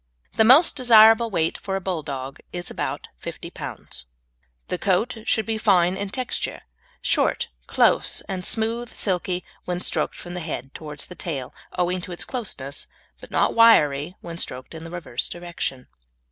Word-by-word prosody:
The 220 - +5
most 265 +9 +8
desirable 230 -2 +7
weight 165 -5 0
for 195 -1 -3
a - - 0
Bulldog 145 -7 -4
is 175 0 -4
about - - -4
50 - - -7
lbs. - - -6 0.6
The 180 - -2
coat 205 +6 +1
should 220 - +2
be 225 -1 -1
fine 185 -4 +4
in 200 +1 -4
texture, 255 +4 -3 0.4
short, - - +1 0.2
close, - - +3
and 185 -2 -5
smooth, 230 +4 -1
silky 180 -2 -1 0.2
when 180 0 -2
stroked - - 0
from 175 - -9
the 180 - -4
head 150 -5 -5
towards 150 -2 -6
the - - -10
tail 140 -8 -5 0.2
owing 180 0 0
to 180 - -8
its 175 - -2
closeness, 165 - -4 0.3
but - - -12
not - - +2
wiry 170 -8 +5
when 170 0 -6
stroked 130 +4 -2
in 160 0 -8
the - - -7
reverse 165 -8 -3
direction. 170 -7 -4
180 Hz, 160 wpm, -24 LUFS, 160-220 Hz, 0.6 s, most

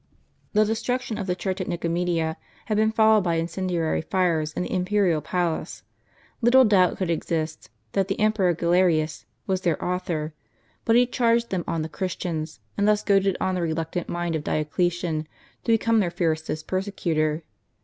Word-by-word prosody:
The 215 0 +4
destruction 230 +1 -2
of 195 - -4
the 180 - 0
church 190 +1 -3
at 185 - -4
JSTicomedia 170 -1 -1 0.3
had 215 - -1
been 220 +1 +3
followed 220 -2 +4
by 170 -2 +1
incendiary 170 0 -1
fires 165 -3 0
in 180 - -3
the - - -4
imperial 185 -3 +2
palace. 170 +1 -2 0.6
Little 255 +2 +6
doubt 190 -4 +4
could 185 -3 -1
exist 160 -1 -2 0.2
that 195 -1 +1
the 195 - -2
Emperor 210 -5 +2
Galerius 170 -2 +2 0.2
was 190 -1 0
their 170 -4 +1
author; 175 -4 -2 0.5
but 225 - +4
he 245 +1 +6
charged 235 -1 +1
them 185 -3 -1
on 165 -1 -1
the - - -3
Christians; 160 -1 -4 0.2
and 205 - +3
thus 210 0 +3
goaded 195 -2 +3
on 185 - 0
the 180 - -1
reluctant 165 +1 -2
mind 175 -1 -2
of 155 - -2
Dioclesian 160 +1 -1 0.4
to 230 - +2
become 225 0 +3
their 185 -4 +1
fiercest 160 -3 -2
perse 190 +2 -2
cutor. 155 -1 0
180 Hz, 170 wpm, -25 LUFS, 165-205 Hz, 0.6 s, Little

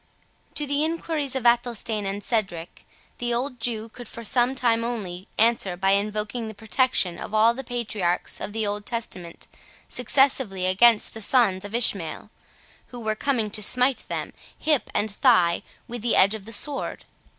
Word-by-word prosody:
To 295 - -1
the 285 +1 0
enquiries 315 -4 -2
of 260 -2 -2
Athelstane 235 -3 +1
and 200 +1 -4
Cedric, 190 -8 -3 0.3
the 240 -1 0
old 250 +1 -3
Jew 225 -1 -3
could 240 +1 -11
for 230 - -9
some 245 +3 +2
time 230 -3 +1
only 195 -6 -5
answer 220 -5 +2
by 195 +1 +2
invoking 210 +3 -1
the 220 - -8
protection 210 -3 +1
of 215 - -6
all 225 +2 +5
the 270 +3 -7
patriarchs 215 -8 -2
of 205 - -4
the 220 0 -1
Old 205 0 -3
Testament 185 -7 -5 0.4
successively 250 -6 +1
against 210 +4 +4
the 220 - -5
sons 205 -5 +3
of 205 +3 -6
Ishmael, 210 -3 -1 0.6
who 245 - -9
were 220 -2 -1
coming 225 -2 -1
to 210 - -1
smite 250 +5 +3
them, - - -4 0.2
hip 300 -4 +1
and 215 0 0
thigh, 190 -7 +3 0.3
with 240 -1 -6
the 235 +1 +1
edge 200 +2 +5
of 215 -3 -6
the 225 - -8
sword. 285 +5 -2
225 Hz, 170 wpm, -24 LUFS, 205-245 Hz, 0.6 s, all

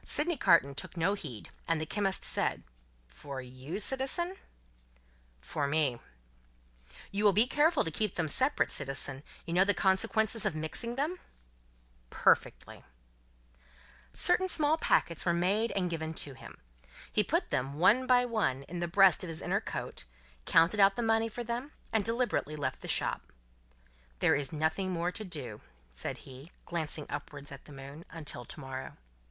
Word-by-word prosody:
hi! - - -33
hi!" - - -19
Sydney 315 +2 +3
Carton 165 - +4
took 155 +6 -6
no 170 +4 +2
heed, 140 - -7 0.2
and 165 -1 +1
the 155 - -2
chemist 195 +2 -1
said: - - +1 0.4
"For 130 - -8
you, 130 +7 -7
citizen?" 270 - -1 1.1
"For 140 - -2
me." 140 -5 +1 1.1
"You 200 +2 -1
will 205 -2 +6
be 215 +5 +5
careful 295 +4 +3
to 165 - -3
keep 210 +4 -1
them 165 -2 0
separate, 260 - +2
citizen? 135 -1 -1 0.2
You 170 - -4
know 180 +2 +5
the 205 +1 +2
consequences 220 +3 +2
of - - 0
mixing 160 +10 -4
them?" 310 +7 -2 0.9
"Perfectly." - - +1 1.3
Certain 375 +1 +3
small 310 -2 +3
packets 170 - +2
were 170 -1 +2
made 200 +7 +1
and 185 -2 +1
given 160 -1 -3
to 145 - -1
him. 130 - -12 0.5
He - - +3
put - - -1
them, 135 +2 -1
one 220 - +4
by 250 0 +5
one, 210 - 0
in 175 +4 -7
the 175 - -1
breast 190 0 +5
of - - -4
his 160 -1 -2
inner - - 0
coat, - - -5 0.4
counted 165 +6 +4
out 195 0 +6
the 240 - -2
money 225 0 +2
for 240 +2 -5
them, 240 +5 -4 0.2
and 220 -2 +3
deliberately 230 - 0
left 140 -3 -3
the - - -8
shop. - - -1 0.9
"There - - +3
is 145 -2 -1
nothing 160 +5 0
more 175 0 -1
to 215 - -5
do," 140 - -6 0.3
said - - -4
he, 135 +4 -11 0.2
glancing 155 -3 -1
upward 145 -1 -7
at 135 - -11
the - - -14
moon, 140 +3 -10
"until 150 -6 -6
to - - -6
morrow. 130 -1 -7
175 Hz, 170 wpm, -31 LUFS, 145-225 Hz, 1.3 s, will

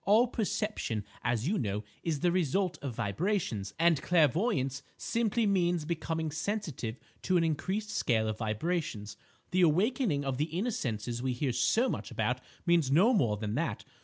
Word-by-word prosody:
"All 215 +4 +5
perception, 210 - -2 0.2
as 120 +2 0
you 210 +4 +1
know, 105 -3 -2 0.2
is 155 -4 -2
the 175 0 +3
result 180 +1 +1
of 135 -5 -4
vibrations; 115 - -1
and 165 -3 +4
clairvoyance 155 - +2 0.2
simply 230 0 0
means 175 -5 +2
becoming 160 -1 -2
sensitive 155 - -3 0.2
to 185 0 +2
an 170 - +3
increased 190 +7 -1
scale 110 - +1
of 110 0 -3
vibrations. 110 - -2 0.4
The 185 0 +3
awakening 180 - +2
of 135 -1 -2
the 150 - +2
inner 180 +10 -2
senses 120 - -3
we 130 0 0
hear 130 +2 -1
so 235 - +3
much - - -3
about 125 +3 -1 0.2
means 170 -6 +3
no 185 - +5
more 120 - +2
than 105 0 -3
that. - - -3
160 Hz, 165 wpm, -31 LUFS, 120-190 Hz, 0.4 s, All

